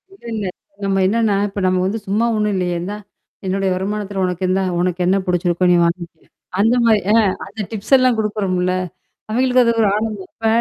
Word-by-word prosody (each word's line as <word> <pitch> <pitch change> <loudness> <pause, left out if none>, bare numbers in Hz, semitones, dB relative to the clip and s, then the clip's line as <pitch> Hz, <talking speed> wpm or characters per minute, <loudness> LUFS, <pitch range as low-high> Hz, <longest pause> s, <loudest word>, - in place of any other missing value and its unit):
இல்ல 310 - -20
இல்ல. 210 -3 -3 0.4
நம்ம 195 0 +1
என்னான்னா 215 0 +2
இப்ப 200 0 -6
நம்ம 185 0 +2
வந்து 215 +4 -1
சும்மா 215 +4 +1
ஒண்ணும் 210 -1 0
இல்லையே? 180 -1 -1
இந்தா! 205 +4 -4 0.5
என்னுடைய 190 0 0
வருமானத்தில 200 0 -3
உனக்கு 180 0 -3
இந்தா 190 +1 +2 0.2
உனக்கு 180 0 0
என்னா 190 +2 +3
புடிச்சிருக்கோ 180 0 +1
நீ - - +5
வாங்கிக்க. 170 -1 -3 0.4
அந்த 225 +4 +4
மாரி 220 -2 +5
அ - - +5 0.3
அந்த 210 +2 -7
டிப்ஸ் 220 +5 -3
எல்லாம் 255 -3 +3
குடுக்கறோம்ல. 185 -4 0 0.6
அவய்ங்களுக்கு 250 +2 +3
அது 235 - +3
ஒரு 210 - +4
ஆனந்தம் 215 -3 -3
இப்ப 225 - -3
200 Hz, 180 wpm, -19 LUFS, 185-220 Hz, 0.6 s, நீ